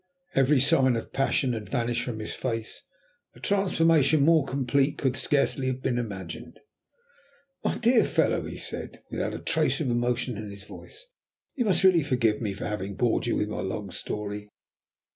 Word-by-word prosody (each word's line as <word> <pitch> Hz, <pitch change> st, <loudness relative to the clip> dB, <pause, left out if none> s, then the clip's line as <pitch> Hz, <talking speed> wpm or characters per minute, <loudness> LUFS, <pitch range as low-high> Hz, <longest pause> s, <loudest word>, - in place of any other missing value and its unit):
Every 135 Hz, +1 st, +4 dB
sign 135 Hz, -3 st, +4 dB
of 115 Hz, -, -5 dB
passion 135 Hz, -1 st, +1 dB
had 110 Hz, -2 st, -5 dB
vanished 120 Hz, -2 st, 0 dB
from 120 Hz, -3 st, -4 dB
his 110 Hz, -, -5 dB
face. 115 Hz, -3 st, -4 dB, 0.5 s
A -, -, -15 dB
transformation 165 Hz, -7 st, +3 dB
more 160 Hz, -3 st, +4 dB
complete 135 Hz, +2 st, +1 dB
could 130 Hz, -2 st, 0 dB
scarcely 135 Hz, -2 st, +1 dB
have 130 Hz, 0 st, -3 dB
been 120 Hz, -1 st, 0 dB
imagined. 95 Hz, -8 st, -7 dB, 1.0 s
"My -, -, 0 dB
dear 240 Hz, 0 st, +4 dB
fellow," -, -, +1 dB
he -, -, -7 dB
said, -, -, -6 dB
without -, -, -2 dB
a -, -, -3 dB
trace -, -, +1 dB
of 140 Hz, -6 st, 0 dB
emotion 120 Hz, 0 st, 0 dB
in 105 Hz, 0 st, -6 dB
his 100 Hz, 0 st, -10 dB
voice, -, -, -12 dB, 0.5 s
"you 245 Hz, -, -1 dB
must 195 Hz, -2 st, +3 dB
really 185 Hz, -3 st, +6 dB
forgive 125 Hz, -7 st, +1 dB
me 105 Hz, -3 st, -1 dB
for 95 Hz, -, -6 dB
having 100 Hz, -1 st, -4 dB
bored 120 Hz, +1 st, +1 dB
you -, -, +1 dB
with 105 Hz, -, -1 dB
my 105 Hz, -, -3 dB
long 100 Hz, +1 st, -4 dB
story. 105 Hz, 0 st, -5 dB
125 Hz, 175 wpm, -27 LUFS, 110-145 Hz, 1.0 s, really